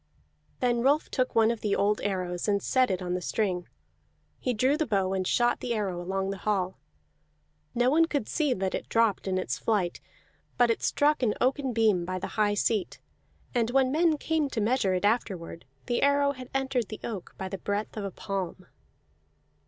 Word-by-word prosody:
Then 240 Hz, -2 st, +2 dB
Rolf 285 Hz, +5 st, +2 dB
took 255 Hz, -2 st, 0 dB
one 225 Hz, 0 st, +5 dB
of 235 Hz, -, -4 dB
the 205 Hz, -2 st, +1 dB
old 210 Hz, +1 st, +1 dB
arrows 180 Hz, -2 st, -2 dB
and 200 Hz, -1 st, +2 dB
set 255 Hz, -2 st, +3 dB
it 185 Hz, -1 st, -1 dB
on 180 Hz, 0 st, -2 dB
the 180 Hz, -, -2 dB
string; 180 Hz, -2 st, -1 dB, 0.7 s
he 255 Hz, -, -1 dB
drew 255 Hz, +5 st, +2 dB
the 315 Hz, 0 st, -1 dB
bow 195 Hz, -4 st, +1 dB
and 185 Hz, -1 st, -1 dB
shot 240 Hz, 0 st, +2 dB
the 240 Hz, -2 st, -2 dB
arrow 190 Hz, -5 st, -2 dB
along 190 Hz, +2 st, -2 dB
the 195 Hz, -, -6 dB
hall. 190 Hz, -3 st, -1 dB, 1.0 s
No 245 Hz, +2 st, +3 dB
one 330 Hz, +3 st, +5 dB
could 285 Hz, -8 st, -2 dB
see 300 Hz, -5 st, +1 dB
that 190 Hz, 0 st, -2 dB
it -, -, -4 dB
dropped 225 Hz, -4 st, +2 dB
in 185 Hz, -1 st, 0 dB
its 125 Hz, -9 st, -2 dB
flight; 185 Hz, -, 0 dB, 0.6 s
but 245 Hz, -1 st, +4 dB
it 230 Hz, -, -2 dB
struck 295 Hz, 0 st, +2 dB
an 225 Hz, -4 st, +1 dB
oaken 265 Hz, +1 st, +1 dB
beam 220 Hz, -6 st, +2 dB
by 185 Hz, +1 st, -3 dB
the 185 Hz, -, -5 dB
high 210 Hz, -1 st, +2 dB
seat, 210 Hz, -1 st, 0 dB, 0.5 s
and 235 Hz, -2 st, +1 dB
when 260 Hz, 0 st, +3 dB
men 320 Hz, +1 st, +3 dB
came 310 Hz, -1 st, 0 dB
to 240 Hz, -, -3 dB
measure 210 Hz, -3 st, +2 dB
it 185 Hz, -, 0 dB
afterward, 190 Hz, -, -1 dB, 0.2 s
the 240 Hz, -, 0 dB
arrow 280 Hz, 0 st, +3 dB
had 255 Hz, -2 st, -9 dB
entered 265 Hz, -4 st, 0 dB
the 215 Hz, -, -7 dB
oak 205 Hz, -6 st, -6 dB
by 190 Hz, -, -4 dB
the 195 Hz, 0 st, -5 dB
breadth 205 Hz, +3 st, -3 dB
of 215 Hz, -, -4 dB
a 200 Hz, -, -2 dB
palm. 190 Hz, -1 st, -5 dB
215 Hz, 200 wpm, -28 LUFS, 190-255 Hz, 1.0 s, one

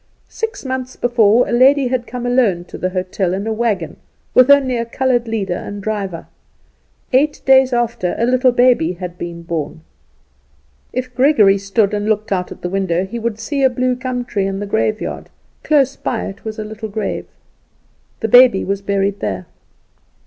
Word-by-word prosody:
Six 450 Hz, -9 st, -5 dB
months 260 Hz, -1 st, -4 dB
before 240 Hz, -1 st, +3 dB
a -, -, -4 dB
lady 260 Hz, +2 st, +4 dB
had 250 Hz, -1 st, -2 dB
come 245 Hz, -1 st, -5 dB
alone 240 Hz, -8 st, +2 dB
to -, -, -10 dB
the 185 Hz, -, -1 dB
hotel 185 Hz, 0 st, -2 dB
in 200 Hz, +2 st, -4 dB
a 220 Hz, -, -1 dB
wagon, 215 Hz, -8 st, -2 dB, 0.4 s
with 255 Hz, +1 st, +6 dB
only 275 Hz, -3 st, +5 dB
a 230 Hz, -, -1 dB
coloured 245 Hz, 0 st, 0 dB
leader 205 Hz, -5 st, -2 dB
and 205 Hz, +3 st, -6 dB
driver. 195 Hz, -4 st, -4 dB, 0.9 s
Eight 290 Hz, +4 st, +2 dB
days 265 Hz, -1 st, +5 dB
after 235 Hz, -7 st, -1 dB
a 230 Hz, -, +1 dB
little 255 Hz, +1 st, +3 dB
baby 245 Hz, -9 st, +3 dB
had 180 Hz, -1 st, -8 dB
been 170 Hz, -1 st, -6 dB
born. 160 Hz, -2 st, -4 dB, 1.1 s
If 255 Hz, 0 st, -4 dB
Gregory 235 Hz, -7 st, +4 dB
stood 200 Hz, +1 st, +1 dB
up -, -, -12 dB
and 210 Hz, +1 st, -1 dB
looked 215 Hz, 0 st, -1 dB
out 180 Hz, -2 st, -1 dB
at -, -, -10 dB
the -, -, -1 dB
window 190 Hz, -1 st, 0 dB
he 235 Hz, +5 st, -6 dB
would 230 Hz, -2 st, -3 dB
see 275 Hz, +5 st, -3 dB
a 265 Hz, -, +5 dB
bluegum 250 Hz, 0 st, -2 dB
tree 200 Hz, -5 st, -1 dB
in 195 Hz, 0 st, -3 dB
the 205 Hz, -, -3 dB
graveyard; 215 Hz, +1 st, -2 dB, 0.3 s
close 275 Hz, -3 st, +2 dB
by 235 Hz, -, -3 dB
it 195 Hz, +1 st, -8 dB
was 220 Hz, -1 st, -6 dB
a 215 Hz, -, -4 dB
little 220 Hz, +1 st, -7 dB
grave. 205 Hz, -1 st, -4 dB, 0.9 s
The 220 Hz, -, 0 dB
baby 245 Hz, -3 st, +6 dB
was 200 Hz, 0 st, -2 dB
buried 200 Hz, 0 st, -1 dB
there. 95 Hz, -, -3 dB
220 Hz, 180 wpm, -18 LUFS, 195-250 Hz, 1.1 s, with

